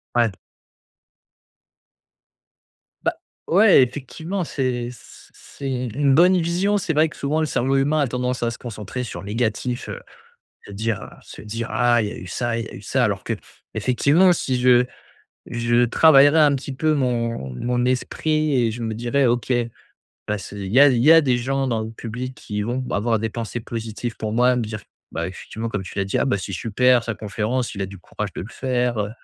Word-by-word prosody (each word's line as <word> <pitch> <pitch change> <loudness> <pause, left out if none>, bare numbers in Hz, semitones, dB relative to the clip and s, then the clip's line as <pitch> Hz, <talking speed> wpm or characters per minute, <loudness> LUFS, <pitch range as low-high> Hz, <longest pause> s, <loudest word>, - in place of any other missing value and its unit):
Ouais. 120 -2 +3 2.7
Bah, - - +1 0.3
ouais, 195 -6 +6
effectivement, 160 +8 -4
c'est 125 -6 -2
c 120 - -16
c'est 140 - -8
u 125 -1 -2
une 135 +4 +2
bonne 180 +4 +6
vision. 180 +5 +1
C'est 180 -4 -1
vrai 155 +1 +3
que, - - -14
souvent, 145 +3 -1
le 155 - +2
cerveau 135 -1 0
humain 145 +3 +2
a 140 - +2
tendance 125 0 -2
à 115 - +1
se 115 - -7
concentrer 115 +1 -6
sur 120 - -6
le 100 - -10
négatif, 115 +2 -2
heu, - - -6 0.6
se 100 - -11
dire, 110 0 -2
heu, - - -9
se - - -12
dire: 115 +2 -5
«Ah 120 -1 +3
il 105 - -1
y - - -8
a - - -7
eu 90 - -9
ça, 120 +5 -2
il 115 - -3
y - - -9
a - - -12
eu - - -10
ça», - - 0
alors - - 0
qu'effectivement, 140 - +1
si 130 -6 -1
je 125 0 +5 0.6
je 120 0 +2
travaillerais 145 +3 +6
un 145 -2 +5
petit 140 0 -4
peu 155 +3 +1
mon 115 - -1
mon 125 - -1
esprit 155 +4 0
et 115 - 0
je 120 +2 -6
me 110 -1 -2
dirais: 120 +5 +1
«OK 120 +1 +1 0.8
bah, 105 0 0
ce 100 - -9
il 100 0 -5
y 130 - +6
a 145 - +9
il 125 -3 +2
y 155 +5 +8
a 165 - +8
des 130 -4 +1
gens 135 +2 -1
dans 115 -3 0
le 110 - -5
public 120 +3 -6
qui 105 0 -4
vont 125 +4 -2
avoir 110 +2 +1
des 110 +1 -2
pensées 115 +1 -4
positives 115 +1 -5
pour 110 -1 -3
moi», 125 +2 +3
me 120 - 0
dire, 110 -1 -5 0.3
bah, - - -2
effectivement, 115 +1 -6
comme 105 -3 -3
tu 95 - -8
l'as 100 - +1
dit: 95 - -1
«Ah, - - +2
bah, 130 -7 +1
c'est 95 +1 -6
super 120 +5 +2
sa 115 - -3
conférence, 110 +4 -2
il 100 - -3
a - - -2
du 100 0 -10
courage - - -6
de - - -5
le 100 - -8
faire, 125 -3 -1
heu, 105 0 -1
120 Hz, 210 wpm, -22 LUFS, 110-135 Hz, 2.7 s, a